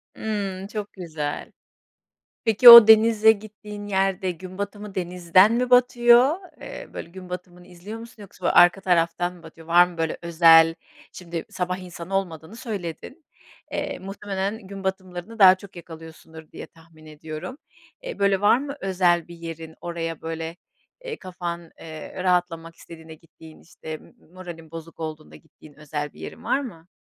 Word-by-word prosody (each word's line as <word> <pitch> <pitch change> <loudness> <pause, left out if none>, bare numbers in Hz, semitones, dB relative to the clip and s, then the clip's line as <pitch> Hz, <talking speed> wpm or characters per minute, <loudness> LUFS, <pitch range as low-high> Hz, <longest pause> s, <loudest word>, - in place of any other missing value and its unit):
Hımm, 200 -3 -4
çok 210 -1 -6
güzel. 160 -5 -6 0.9
Peki 230 +2 +7
o 235 -2 +12
denize 220 0 +6
gittiğin 210 -1 -8
yerde 190 -1 0
gün 185 +2 -11
batımı 205 0 -6
denizden 180 +3 +3
mi 250 +1 0
batıyor, 245 +2 +5 0.3
eee, - - -9
böyle, - - -8
gün 185 0 -12
batımını 180 0 -9
izliyor 190 +6 -10
musun 230 -2 -13
yoksa 185 -3 -4
arka 175 +2 +5
taraftan 175 0 0
mı 170 -2 -18
batıyor? 160 0 -14
Var 175 +1 +5
mı, 175 - -13
böyle, 160 -1 -2
özel? 165 -1 +5 0.4
Şimdi 170 -2 -7
sabah 180 0 -3
insanı 180 0 -7
olmadığını 175 +1 -4
söyledin. 210 - -7 0.5
Eee, 285 -1 -4
muhtemelen 195 +1 -5
gün 195 0 -9
batımlarını 190 +3 -5
daha 190 -1 +8
çok 190 0 -15
yakalıyorsundur 160 -1 -13
diye - - -9
tahmin 165 -1 -20
ediyorum. 155 - -9 0.5
Eee, - - -7
böyle, 200 -1 +2
var 205 +3 +5
mı 280 +1 -6
özel 180 -3 +1
bir 170 - -11
yerin? 165 -1 -9
Oraya, 165 -2 -5
böyle, 165 +1 -5 0.5
eee, 480 -2 -6
kafan, 175 -2 -7
eee, 160 +3 -8
rahatlamak 175 -2 -1
istediğinde 160 -1 -13
gittiğin, 160 0 -17
işte 160 -1 -9
m - - -20 0.2
moralin 170 -3 -11
bozuk 165 0 -10
olduğunda 155 -1 -7
gittiğin 155 -2 -18
özel 150 -1 -6
bir - - -17
yerin - - -9
var 275 - +1
mı? 170 -10 -10
180 Hz, 155 wpm, -23 LUFS, 165-205 Hz, 0.9 s, o